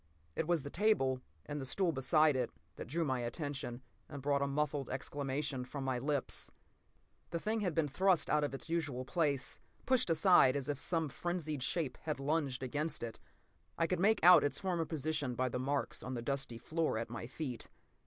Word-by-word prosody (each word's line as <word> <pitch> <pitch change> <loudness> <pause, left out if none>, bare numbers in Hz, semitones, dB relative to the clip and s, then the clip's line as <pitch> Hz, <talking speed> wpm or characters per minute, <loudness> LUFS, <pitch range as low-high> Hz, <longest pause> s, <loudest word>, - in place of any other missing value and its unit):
p> - - -9
It 160 - 0
was 170 -5 +2
the 145 - -6
table, 145 -11 +2 0.2
and 145 0 -4
the - - -4
stool 185 +4 +1
beside 155 +2 +3
it, 125 -2 0 0.3
that - - -7
drew 165 +6 0
my 130 -3 0
attention 130 -1 -4 0.3
and 145 - -6
brought 140 +1 +1
a 140 - +2
muffled 145 -1 -1
exclamation 140 0 -3
from 135 +2 -5
my 130 -2 0
lips. 140 +1 -1 0.8
The 170 - -2
thing 220 +5 -1
had 185 -6 -1
been 160 -3 +2
thrust 180 +3 +3
out 150 0 +2
of 145 - 0
its 135 - -8
usual 150 -7 -2
place, 140 -3 0 0.3
pushed 255 -6 +3
aside 165 -5 +6
as 140 -1 -2
if 145 -1 -2
some 165 -3 +1
frenzied 155 -2 -3
shape 135 +1 -1
had 155 -3 -3
lunged 140 -3 0
against 145 +2 -2
it. 115 -1 -5 0.6
I 165 - +3
could 180 +1 0
make 205 +1 +3
out 180 +1 +9
its 145 - 0
former 175 -4 0
position 150 -4 -2
by 130 +1 +1
the 125 - -3
marks 140 +2 -1
on 130 +1 -4
the 120 - -4
dusty 135 -3 -2
floor 160 0 -1
at 115 +1 -4
my 115 0 -5
feet. 130 -3 -4
145 Hz, 200 wpm, -35 LUFS, 130-165 Hz, 0.8 s, out